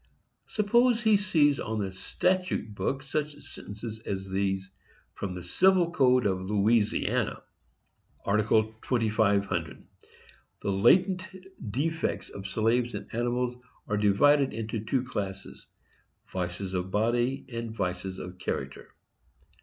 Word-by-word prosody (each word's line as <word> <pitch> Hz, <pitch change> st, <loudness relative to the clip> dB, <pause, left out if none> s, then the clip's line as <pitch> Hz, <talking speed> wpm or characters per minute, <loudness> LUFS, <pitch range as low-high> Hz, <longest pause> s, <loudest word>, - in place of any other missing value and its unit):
Suppose 235 Hz, +3 st, +3 dB
he 220 Hz, -2 st, +5 dB
sees 155 Hz, -8 st, +3 dB
on 110 Hz, 0 st, -3 dB
the 100 Hz, -2 st, -2 dB
statute 180 Hz, -, -1 dB
book 135 Hz, +6 st, -2 dB
such 150 Hz, +1 st, -2 dB
sentences 110 Hz, -5 st, -8 dB
as 95 Hz, -3 st, -4 dB
these, 95 Hz, 0 st, -1 dB, 0.4 s
from 95 Hz, -2 st, -5 dB
the 90 Hz, -, -6 dB
civil 180 Hz, -, +3 dB
code 130 Hz, -5 st, +4 dB
of 95 Hz, -1 st, -1 dB
Louisiana: 105 Hz, +1 st, +1 dB, 0.8 s
Art. 105 Hz, +2 st, +2 dB
2500. 110 Hz, -, +1 dB, 0.8 s
The 100 Hz, -, 0 dB
latent 185 Hz, -, +4 dB, 0.4 s
defects 160 Hz, +8 st, -2 dB
of 100 Hz, 0 st, -7 dB
slaves 115 Hz, +4 st, +1 dB
and -, -, -8 dB
animals 120 Hz, +1 st, -1 dB, 0.3 s
are 105 Hz, -, 0 dB
divided 130 Hz, +8 st, +4 dB
into 110 Hz, -1 st, -3 dB
two 125 Hz, +3 st, 0 dB
classes,—vices 95 Hz, -3 st, -7 dB
of 90 Hz, 0 st, -2 dB
body 120 Hz, +6 st, +1 dB
and 115 Hz, -1 st, -4 dB
vices 95 Hz, -2 st, -3 dB
of 90 Hz, 0 st, -8 dB
character. -, -, -5 dB
110 Hz, 115 wpm, -28 LUFS, 100-140 Hz, 0.8 s, he